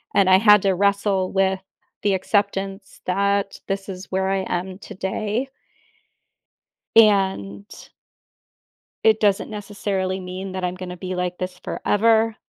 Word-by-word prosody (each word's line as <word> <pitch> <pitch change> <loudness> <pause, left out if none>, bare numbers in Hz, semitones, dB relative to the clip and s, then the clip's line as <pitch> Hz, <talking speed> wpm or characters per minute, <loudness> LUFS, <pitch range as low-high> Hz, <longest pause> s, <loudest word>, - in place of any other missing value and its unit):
and 195 - +4
I 185 0 +6
had 210 -2 +6
to 195 -1 +3
wrestle 200 -1 +1
with 190 -1 +1 0.4
the 200 -2 +2
acceptance 195 0 -2
that 200 +1 0
this 195 0 -3
is 185 0 -8
where 190 0 0
I 195 0 +1
am 185 +2 -3
today. 210 +5 -3 1.5
And 190 - +3 1.4
it 220 -1 +4
doesn't 205 -1 +2
necessarily 200 -2 -3
mean 185 +1 -6
that 185 -1 -4
I'm 180 0 -1
gonna 180 -1 -7
be 185 +1 -5
like 180 0 -3
this 185 0 -5
forever, 225 +1 +2
195 Hz, 130 wpm, -22 LUFS, 185-205 Hz, 1.5 s, I